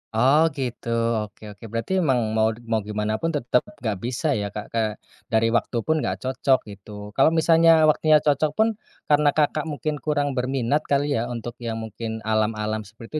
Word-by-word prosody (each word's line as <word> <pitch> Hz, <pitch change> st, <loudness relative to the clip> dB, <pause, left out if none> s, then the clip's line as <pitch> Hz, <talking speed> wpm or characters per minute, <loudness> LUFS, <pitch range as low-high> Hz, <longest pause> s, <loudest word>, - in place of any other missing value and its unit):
Oh 140 Hz, +8 st, +5 dB
gitu, 125 Hz, -3 st, -4 dB, 0.3 s
oke 105 Hz, 0 st, -8 dB
oke, 100 Hz, +2 st, -16 dB
berarti 115 Hz, +8 st, -4 dB
emang 135 Hz, -8 st, +2 dB, 0.2 s
mau 110 Hz, 0 st, +3 dB, 0.2 s
mau 110 Hz, -, +3 dB
gimanapun 105 Hz, +6 st, -1 dB
tetap 125 Hz, -3 st, +2 dB, 0.2 s
nggak 110 Hz, -5 st, -2 dB
bisa 125 Hz, +6 st, -2 dB
ya 100 Hz, -, -2 dB
Kak, 105 Hz, -, -4 dB
eee, 110 Hz, -1 st, +1 dB, 0.4 s
dari 110 Hz, 0 st, +3 dB
waktu 120 Hz, +1 st, 0 dB
pun 160 Hz, +5 st, +1 dB
nggak 95 Hz, -9 st, -1 dB
cocok, 130 Hz, 0 st, +2 dB
gitu. 105 Hz, +1 st, -10 dB
Kalau 135 Hz, -, +5 dB
misalnya 165 Hz, 0 st, +5 dB
waktunya 155 Hz, +1 st, +4 dB
cocok 150 Hz, +1 st, +2 dB
pun, 220 Hz, -, +3 dB, 0.4 s
karena 150 Hz, 0 st, +4 dB
Kakak 150 Hz, 0 st, +1 dB
mungkin 150 Hz, 0 st, -3 dB
kurang 145 Hz, -1 st, 0 dB
berminat 130 Hz, +2 st, 0 dB
kali 145 Hz, +1 st, +2 dB
ya, 115 Hz, -, -2 dB
untuk 120 Hz, 0 st, -6 dB
yang 115 Hz, -2 st, -4 dB
mungkin 110 Hz, 0 st, -6 dB
alam-alam 110 Hz, 0 st, 0 dB
seperti 115 Hz, +8 st, -7 dB
120 Hz, 175 wpm, -23 LUFS, 110-150 Hz, 0.4 s, Oh